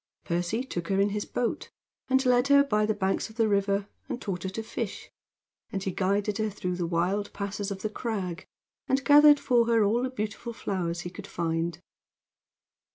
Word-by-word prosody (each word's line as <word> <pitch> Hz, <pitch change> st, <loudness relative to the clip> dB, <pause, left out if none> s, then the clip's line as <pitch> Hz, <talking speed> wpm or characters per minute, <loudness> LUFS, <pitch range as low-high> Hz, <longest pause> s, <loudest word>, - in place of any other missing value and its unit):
Percy 175 Hz, +8 st, -1 dB
took 175 Hz, -10 st, -5 dB
her 195 Hz, 0 st, +1 dB
in 200 Hz, +1 st, +3 dB
his 205 Hz, 0 st, -3 dB
boat, 245 Hz, -1 st, -2 dB, 0.4 s
and 265 Hz, 0 st, +3 dB
led 250 Hz, +1 st, +4 dB
her 280 Hz, 0 st, +7 dB
by 215 Hz, -6 st, +1 dB
the 215 Hz, -, +2 dB
banks 195 Hz, +2 st, -1 dB
of 220 Hz, -, -15 dB
the 225 Hz, -1 st, +2 dB
river, 200 Hz, 0 st, +1 dB, 0.2 s
and -, -, -3 dB
taught 185 Hz, -7 st, -4 dB
her 190 Hz, -, -3 dB
to 220 Hz, +4 st, -5 dB
fish, 220 Hz, -, -5 dB, 0.6 s
and 195 Hz, -1 st, -3 dB
he 195 Hz, -, -1 dB
guided 200 Hz, +3 st, 0 dB
her 215 Hz, 0 st, +1 dB
through 180 Hz, -3 st, -3 dB
the 175 Hz, -1 st, -2 dB
wild 185 Hz, +5 st, 0 dB
passes 200 Hz, 0 st, -3 dB
of 195 Hz, -1 st, -6 dB
the 215 Hz, -, 0 dB
crag, 200 Hz, -7 st, -4 dB, 0.4 s
and 270 Hz, +1 st, +1 dB
gathered 295 Hz, 0 st, +8 dB
for 240 Hz, -4 st, +3 dB
her 230 Hz, -2 st, +4 dB
all 220 Hz, +4 st, +2 dB
the 255 Hz, -, -1 dB
beautiful 235 Hz, 0 st, -4 dB
flowers 175 Hz, -5 st, -2 dB
he 175 Hz, -, -6 dB
could 200 Hz, +2 st, -9 dB
find. 165 Hz, 0 st, -2 dB
205 Hz, 195 wpm, -28 LUFS, 185-230 Hz, 0.6 s, gathered